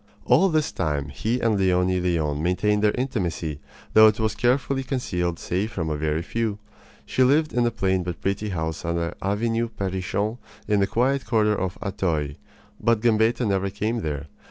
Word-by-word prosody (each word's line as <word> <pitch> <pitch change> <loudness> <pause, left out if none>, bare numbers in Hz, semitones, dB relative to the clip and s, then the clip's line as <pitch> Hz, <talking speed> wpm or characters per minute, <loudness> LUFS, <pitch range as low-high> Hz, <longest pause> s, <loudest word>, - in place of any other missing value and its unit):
All 195 - +5
this 155 -3 +1
time 75 -3 -2
he 110 - -1
and 110 -3 +2
Leonie 90 -1 +2
Leon 80 -5 0
maintained 105 +5 +1
their 105 - +5
intimacy, 90 - -2 0.3
though 110 0 +9
it 110 0 +2
was 110 -1 +1
carefully 135 +4 +1
concealed 90 -11 -2
save 95 +7 -2
from 80 -6 -3
a - - 0
very 75 +2 -1
few. 110 +1 -2 0.5
She - - -1
lived 150 +4 +3
in 120 -1 +2
a - - +3
plain 95 -4 0
but 90 -2 -5
pretty 100 +2 -2
house 80 -3 -3
on 85 0 -1
the 85 0 -2
Avenue 115 +4 0
Perrichont 100 +3 -2 0.3
in 105 -1 +2
the 100 - +2
quiet 130 +5 0
quarter 110 -2 +3
of 95 -2 -3
Auteuil; 85 -7 -1 0.5
but 115 -2 +2
Gambetta 115 +1 +2
never 100 -1 0
came 110 +4 -2
there. 75 -3 -3
100 Hz, 180 wpm, -24 LUFS, 85-115 Hz, 0.5 s, though